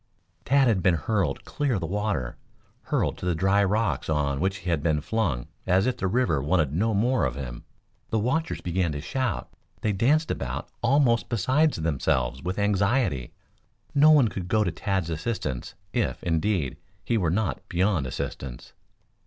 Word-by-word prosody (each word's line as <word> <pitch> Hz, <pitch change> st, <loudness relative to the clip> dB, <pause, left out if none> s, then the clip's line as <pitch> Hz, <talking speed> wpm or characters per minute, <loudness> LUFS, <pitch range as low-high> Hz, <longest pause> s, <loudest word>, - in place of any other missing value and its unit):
Tad 135 Hz, 0 st, +4 dB
had 105 Hz, -6 st, +2 dB
been 90 Hz, -1 st, +4 dB
hurled 85 Hz, -2 st, -1 dB
clear 140 Hz, -4 st, -1 dB
of -, -, 0 dB
the 85 Hz, -, -3 dB
water, 90 Hz, -, -2 dB, 0.5 s
hurled -, -, 0 dB
to -, -, -5 dB
the 90 Hz, -, +1 dB
dry 95 Hz, +4 st, +3 dB
rocks 105 Hz, -1 st, 0 dB
on 70 Hz, -3 st, 0 dB
which 95 Hz, +3 st, 0 dB
he -, -, -1 dB
had 80 Hz, -3 st, +1 dB
been 80 Hz, -1 st, +1 dB
flung 75 Hz, -, -1 dB, 0.2 s
as 95 Hz, +3 st, +3 dB
if 125 Hz, -1 st, 0 dB
the 95 Hz, -, -1 dB
river 95 Hz, -, +1 dB
wanted 75 Hz, -1 st, +1 dB
no 110 Hz, +6 st, +1 dB
more 125 Hz, +6 st, +2 dB
of -, -, 0 dB
him. 65 Hz, -4 st, -7 dB, 0.4 s
The 110 Hz, -, 0 dB
watchers 130 Hz, +9 st, -1 dB
began 90 Hz, -2 st, 0 dB
to 75 Hz, -, -4 dB
shout. 125 Hz, -, -2 dB, 0.3 s
They 110 Hz, -, +1 dB
danced 150 Hz, -, +2 dB
about 65 Hz, -1 st, -4 dB
almost 120 Hz, -2 st, +3 dB
beside 130 Hz, +8 st, +2 dB
themselves 65 Hz, -5 st, 0 dB
with 90 Hz, +6 st, -3 dB
anxiety. 100 Hz, -, +1 dB, 0.6 s
No 145 Hz, +2 st, +6 dB
one 145 Hz, -7 st, +6 dB
could 95 Hz, -2 st, -5 dB
go 110 Hz, +3 st, +2 dB
to 90 Hz, -, -1 dB
Tad's 95 Hz, -1 st, -2 dB
assistance, 80 Hz, -, -3 dB, 0.2 s
if, 120 Hz, -4 st, -1 dB
indeed, 85 Hz, -3 st, 0 dB, 0.3 s
he 120 Hz, -, +1 dB
were 90 Hz, -7 st, +1 dB
not 100 Hz, +4 st, -1 dB
beyond 90 Hz, -5 st, +1 dB
assistance. 65 Hz, 0 st, -6 dB
95 Hz, 170 wpm, -26 LUFS, 80-115 Hz, 0.6 s, No